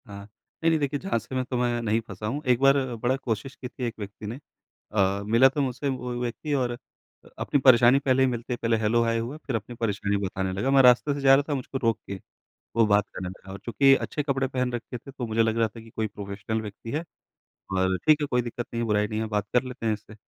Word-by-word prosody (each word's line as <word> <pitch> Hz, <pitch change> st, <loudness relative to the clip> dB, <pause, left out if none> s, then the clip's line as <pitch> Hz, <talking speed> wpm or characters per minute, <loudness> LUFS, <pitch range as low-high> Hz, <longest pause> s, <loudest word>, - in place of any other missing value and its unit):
हाँ। 100 Hz, -1 st, -8 dB, 0.4 s
नहीं, 165 Hz, -, +5 dB
नहीं 160 Hz, -, +2 dB
देखिए 145 Hz, 0 st, -1 dB
झाँसे 130 Hz, -, -3 dB
मैं 130 Hz, -, +1 dB
तो 125 Hz, 0 st, -3 dB
मैं 120 Hz, -1 st, 0 dB
नहीं 110 Hz, 0 st, +1 dB
फँसा 100 Hz, +1 st, -7 dB
हूँ। 140 Hz, +7 st, -2 dB
एक 125 Hz, -1 st, +4 dB
बार 135 Hz, 0 st, +5 dB, 0.2 s
बड़ा 120 Hz, +3 st, 0 dB
कोशिश 130 Hz, +1 st, -4 dB
की 125 Hz, -, -7 dB
थी 125 Hz, -, -8 dB
एक 115 Hz, -, -2 dB
व्यक्ति 105 Hz, +1 st, -8 dB
ने। 120 Hz, +5 st, -6 dB, 0.5 s
अ, 100 Hz, -1 st, +1 dB
मिला 115 Hz, +5 st, +5 dB
तो 145 Hz, +2 st, -2 dB
मुझसे 135 Hz, +1 st, -2 dB
वो 125 Hz, -2 st, -3 dB
व्यक्ति 125 Hz, +5 st, -3 dB
और 130 Hz, -3 st, +1 dB, 0.5 s
अ, -, -, -18 dB
अपनी 145 Hz, -, +1 dB
परेशानी 125 Hz, 0 st, +7 dB
पहले 130 Hz, -1 st, +2 dB
ही -, -, +4 dB
मिलते 120 Hz, 0 st, -3 dB
पहले 115 Hz, -1 st, 0 dB
हेलो-हाय 115 Hz, +1 st, +2 dB
हुआ 120 Hz, +6 st, -4 dB
फिर 140 Hz, -5 st, -4 dB
अपनी 115 Hz, +2 st, -5 dB
परेशानी 100 Hz, -3 st, -1 dB
बताने 95 Hz, 0 st, -2 dB
लगा। 105 Hz, +8 st, -1 dB
मैं 135 Hz, 0 st, +6 dB
रास्ते 125 Hz, +4 st, +5 dB
से 140 Hz, -, -5 dB
जा 135 Hz, 0 st, +6 dB
रहा 140 Hz, -, +2 dB
था 145 Hz, -, +1 dB
मुझको 135 Hz, 0 st, -4 dB
रोक 115 Hz, -4 st, +1 dB
के 100 Hz, -, -3 dB, 0.6 s
वो 115 Hz, -1 st, +5 dB
बात 105 Hz, -1 st, +3 dB
करने 90 Hz, -1 st, -5 dB
लगा। 95 Hz, +1 st, -11 dB
और 100 Hz, -, -8 dB
चूँकि 135 Hz, +4 st, +5 dB
अच्छे 150 Hz, -, -3 dB
कपड़े 135 Hz, -2 st, 0 dB
पहन 125 Hz, -1 st, -1 dB
रखे 120 Hz, +1 st, -5 dB
थे 135 Hz, +4 st, -12 dB
तो 130 Hz, -2 st, -5 dB
मुझे 110 Hz, +1 st, +2 dB
लग 110 Hz, 0 st, 0 dB
रहा 115 Hz, -1 st, +3 dB
था 110 Hz, +2 st, -12 dB
कि 115 Hz, -, -14 dB
कोई 110 Hz, 0 st, -2 dB
प्रोफेशनल 100 Hz, +2 st, -4 dB
व्यक्ति 110 Hz, +2 st, -8 dB
है 155 Hz, +3 st, -2 dB, 0.7 s
और 95 Hz, 0 st, +2 dB
ठीक 155 Hz, 0 st, +6 dB
है, 145 Hz, -, 0 dB
कोई 125 Hz, -2 st, +1 dB
दिक्कत 120 Hz, 0 st, -5 dB
नहीं 115 Hz, -, -1 dB
है, -, -, -2 dB
बुराई 105 Hz, -1 st, +2 dB
नहीं 110 Hz, +1 st, -3 dB
है 110 Hz, -, -1 dB
बात 105 Hz, -1 st, -1 dB
कर 125 Hz, -, +4 dB
लेते 125 Hz, -2 st, -7 dB
हैं 110 Hz, -, +2 dB
इससे। 105 Hz, 0 st, -10 dB
120 Hz, 255 wpm, -26 LUFS, 110-130 Hz, 0.7 s, परेशानी